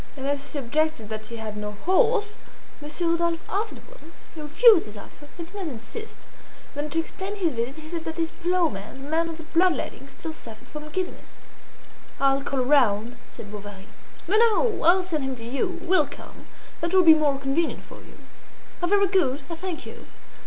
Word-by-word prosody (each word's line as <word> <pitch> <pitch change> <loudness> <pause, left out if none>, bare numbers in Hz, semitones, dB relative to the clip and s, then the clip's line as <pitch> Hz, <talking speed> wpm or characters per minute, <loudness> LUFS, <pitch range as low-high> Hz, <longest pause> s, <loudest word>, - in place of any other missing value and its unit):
And 265 - -5
as 285 0 -2
she - - -5
objected 285 -3 0
that 215 0 -5
she 235 - -7
had 220 -2 -5
no 210 0 -4
horse, 425 +2 +3 0.5
Monsieur 305 +4 -1
Rodolphe 335 0 +1
offered 425 +3 -3
one. - - -15 0.2
She 315 - -8
refused 380 - +6
his 210 0 -10
offer; 290 +7 -12
he 340 - -4
did 330 - -13
not 395 -4 -4
insist. 295 - -7 0.6
Then 290 +1 -3
to 325 +3 0
explain 380 +4 -4
his 360 -5 +1
visit 240 +4 -3
he 310 0 -10
said 330 0 -5
that 320 +1 -4
his 330 -1 0
ploughman, 320 - -1
the - - -7
man 330 +1 +2
of 325 - -6
the 325 - -9
blood 345 +3 +3
letting, - - -6
still 320 - -7
suffered 225 -7 -12
from 300 0 -8
giddiness. 370 +3 -5 0.8
"I'll 275 0 +3
call 275 -1 -1
around," 245 -4 +3
said 205 - -10
Bovary. 205 -1 -9 0.4
"No, 405 +5 +4
no! 460 0 +3
I'll 360 +3 +6
send 320 -6 -2
him 265 -1 -2
to 230 -2 -9
you; 340 - -2
we'll 370 +1 +3
come; - - -12 0.3
that 340 +3 0
will 370 - +7
be 325 -2 +10
more 295 -3 +2
convenient 275 +5 -1
for - - -12
you." - - -16 0.6
"Ah! 350 - +1
very 400 +1 +4
good! 305 -8 +1
I - - -2
thank 355 -1 -5
you." - - -10
315 Hz, 200 wpm, -25 LUFS, 265-360 Hz, 0.8 s, be